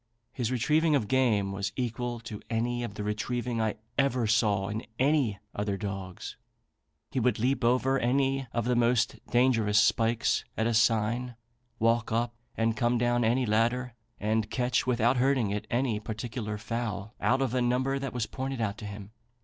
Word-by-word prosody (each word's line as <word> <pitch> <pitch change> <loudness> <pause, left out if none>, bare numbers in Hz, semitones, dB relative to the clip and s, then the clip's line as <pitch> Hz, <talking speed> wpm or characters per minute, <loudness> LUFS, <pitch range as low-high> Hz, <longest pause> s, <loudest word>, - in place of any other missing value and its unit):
His 125 -3 -2
retrieving 150 +5 +2
of 120 -7 0
game 110 -7 +2
was 100 +1 -3
equal 120 -1 -3
to 110 -3 -8
any 120 +1 -1
of 100 -4 -5
the 105 - -4
retrieving 115 +3 -2
I 110 -1 0 0.2
ever 130 -3 +2
saw 105 -3 +2
in 105 +2 -4
any 135 -6 +2 0.2
other 100 -1 -2
dogs. 95 -3 -6 0.7
He 130 - 0
would 125 -2 +2
leap 130 +3 0
over 130 +3 +3
any 135 +2 +1
of 115 -1 -1
the 125 0 +2
most 120 0 +2
dangerous 115 -4 +3
spikes 115 +1 +2
at 110 - +1
a 115 - +1
sign, 115 +2 +2 0.4
walk 115 0 +1
up 120 +1 0 0.2
and 115 0 +1
come 120 0 +1
down 120 0 +2
any 120 +3 +2
ladder, 120 +3 +1 0.3
and 110 +1 0
catch, 125 +1 0
without 120 0 +2
hurting 130 -5 +2
it, 105 0 -3
any 120 -3 0
particular 110 0 -5
fowl 110 -2 -4
out 130 +2 +2
of 130 -3 -2
a 130 - +1
number 130 +3 +1
that 135 -2 -4
was 120 -3 -2
pointed 135 +2 -4
out 105 -2 -2
to 105 - -6
him. 100 0 -8
120 Hz, 175 wpm, -29 LUFS, 110-125 Hz, 0.7 s, over